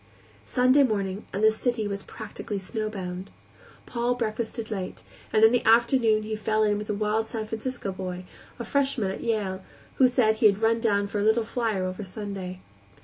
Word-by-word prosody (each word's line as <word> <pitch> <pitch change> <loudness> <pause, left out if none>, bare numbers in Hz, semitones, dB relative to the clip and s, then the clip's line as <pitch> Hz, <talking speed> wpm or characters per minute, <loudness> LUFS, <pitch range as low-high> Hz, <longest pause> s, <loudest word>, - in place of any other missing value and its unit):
Sunday 255 +2 +4
morning 200 -5 0
the 215 +3 +4
city 225 -1 -1
was 200 -1 -3
practically 215 0 -6
snowbound. 195 -3 -4 0.6
Paul 240 0 -1
breakfasted 225 -1 -3
late, 190 -3 -5 0.3
and 215 - +3
in 220 - +8
the 245 - +2
afternoon 230 -1 +4
he 215 0 -3
fell 215 0 +1
in 205 -1 +2
with 210 - -7
a - - +1
wild 215 +2 0
San 220 -1 -4
Francisco 225 -1 -4
boy, 185 -1 -5 0.3
a 235 - -5
freshman 270 -6 +1
at - - -6
Yale, 205 -5 -1 0.4
who 260 - +7
said 240 -4 +2
he 220 - +6
had 200 -1 +2
run 230 +1 +3
down 205 -3 +2
for 205 +1 -3
a - - +1
"little 220 +2 +3
flyer" 220 -4 -1
over 185 +3 -4
Sunday. 190 -2 -6
215 Hz, 180 wpm, -26 LUFS, 200-230 Hz, 0.6 s, in